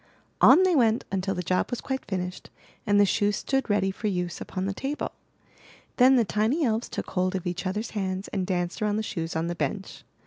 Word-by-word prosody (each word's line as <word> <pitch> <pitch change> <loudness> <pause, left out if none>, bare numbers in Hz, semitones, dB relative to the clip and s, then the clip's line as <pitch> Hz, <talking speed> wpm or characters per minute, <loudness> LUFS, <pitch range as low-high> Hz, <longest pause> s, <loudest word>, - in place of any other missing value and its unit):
On 370 - +8
they 370 -2 +3
went 230 -4 +3
until 195 0 -1
the 180 - -3
job 185 +2 0
was 245 - -3
quite 265 -1 -3
finished 180 -2 -5 0.4
and 205 0 +4
the 205 - +7
shoes 205 +1 +1
stood 270 +2 -1
ready 200 -2 +2
for 210 +3 -4
use 180 -3 -2
upon 185 0 -4
the 195 - -1
table. 275 +8 -3 0.9
Then 260 +1 +7
the 235 -3 +4
tiny 220 - +1
elves 225 0 0
took - - -5
hold 185 +1 0
of 185 - -3
each 180 +2 -3
others* 210 +4 -3
hands 190 -2 -3
and 185 -2 -2
danced 175 -1 -2
around 210 -1 +1
the 220 - -1
shoes 165 -6 -4
on 160 +1 0
the 170 - -2
bench. 170 +5 -4
195 Hz, 215 wpm, -26 LUFS, 185-225 Hz, 0.9 s, On